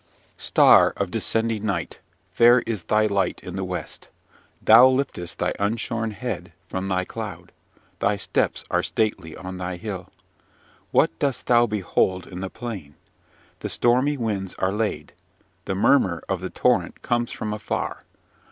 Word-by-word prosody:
"Star -, -, +6 dB
of -, -, -2 dB
descending 115 Hz, -1 st, -1 dB
night! 95 Hz, -6 st, -2 dB, 0.3 s
fair 120 Hz, +5 st, +6 dB
is 110 Hz, -7 st, -4 dB
thy 110 Hz, +4 st, +3 dB
light 100 Hz, -3 st, 0 dB
in 90 Hz, -, -7 dB
the 95 Hz, -, -2 dB
west! 90 Hz, -1 st, -6 dB, 0.5 s
thou 115 Hz, +4 st, +8 dB
liftest 130 Hz, -10 st, -2 dB
thy -, -, 0 dB
unshorn 115 Hz, +2 st, -1 dB
head 105 Hz, -3 st, -5 dB, 0.2 s
from 95 Hz, +1 st, -4 dB
thy 95 Hz, -1 st, 0 dB
cloud; 90 Hz, -6 st, -7 dB, 0.5 s
thy 105 Hz, -, +2 dB
steps 100 Hz, -, -1 dB
are -, -, +2 dB
stately 95 Hz, -7 st, -2 dB
on 90 Hz, 0 st, -7 dB
thy 90 Hz, 0 st, -3 dB
hill. 95 Hz, -2 st, -6 dB, 0.8 s
What -, -, +3 dB
dost 140 Hz, -3 st, -1 dB
thou 120 Hz, -1 st, +4 dB
behold 95 Hz, -3 st, 0 dB
in 90 Hz, -, -8 dB
the 95 Hz, 0 st, -4 dB
plain? 100 Hz, -13 st, -7 dB, 0.6 s
The -, -, -4 dB
stormy 130 Hz, +5 st, +2 dB
winds 100 Hz, -6 st, -3 dB
are 95 Hz, +1 st, 0 dB
laid. 105 Hz, -8 st, -2 dB, 0.5 s
The 95 Hz, -, -2 dB
murmur 95 Hz, -5 st, +3 dB
of -, -, -2 dB
the -, -, -4 dB
torrent -, -, 0 dB
comes 120 Hz, 0 st, 0 dB
from 105 Hz, -1 st, -4 dB
afar. 105 Hz, 0 st, -3 dB
105 Hz, 150 wpm, -24 LUFS, 95-115 Hz, 0.8 s, thou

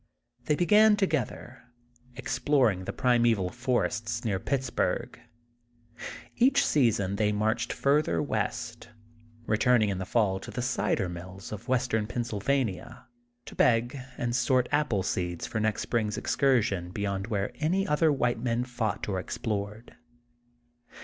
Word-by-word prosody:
They 150 Hz, -, +2 dB
began 210 Hz, +5 st, +5 dB
together, 155 Hz, -, -2 dB, 0.6 s
exploring 130 Hz, -7 st, +1 dB
the -, -, -3 dB
prime 125 Hz, -2 st, +2 dB
val 95 Hz, -3 st, -2 dB
forests 115 Hz, -1 st, -1 dB
near 100 Hz, -4 st, 0 dB
Pittsburgh. 130 Hz, +1 st, -2 dB, 1.2 s
Each 270 Hz, +3 st, +4 dB
season 105 Hz, -8 st, +2 dB
they 105 Hz, 0 st, +2 dB
marched 105 Hz, +1 st, 0 dB
further 145 Hz, +2 st, +1 dB
west, 115 Hz, -2 st, -3 dB, 0.6 s
returning 110 Hz, -1 st, +3 dB
in 95 Hz, -2 st, -2 dB
the 95 Hz, -, -3 dB
fall 100 Hz, -4 st, +1 dB
to -, -, -10 dB
the 125 Hz, -, -4 dB
cider 105 Hz, -6 st, 0 dB
i;aills 90 Hz, +2 st, -8 dB
of 105 Hz, +3 st, -7 dB
Western 125 Hz, -4 st, 0 dB
Pennsylvania, 120 Hz, 0 st, -2 dB, 0.4 s
to -, -, -10 dB
beg 120 Hz, +2 st, +2 dB, 0.2 s
and 120 Hz, -1 st, -1 dB
sort 125 Hz, +1 st, +2 dB
apple 145 Hz, -10 st, +1 dB
seeds 90 Hz, -2 st, -2 dB
for 110 Hz, -, -3 dB
next 110 Hz, -1 st, 0 dB
spring's 110 Hz, -3 st, -1 dB
excursion 115 Hz, -10 st, +1 dB
beyond 100 Hz, +1 st, -3 dB
where 100 Hz, -4 st, -1 dB
any 180 Hz, +6 st, +1 dB
other 150 Hz, +1 st, +3 dB
white 125 Hz, -4 st, 0 dB
men 120 Hz, 0 st, 0 dB
fought 120 Hz, -5 st, -3 dB
or 95 Hz, -2 st, -1 dB
explored. 105 Hz, +1 st, -4 dB
115 Hz, 130 wpm, -28 LUFS, 105-130 Hz, 1.2 s, began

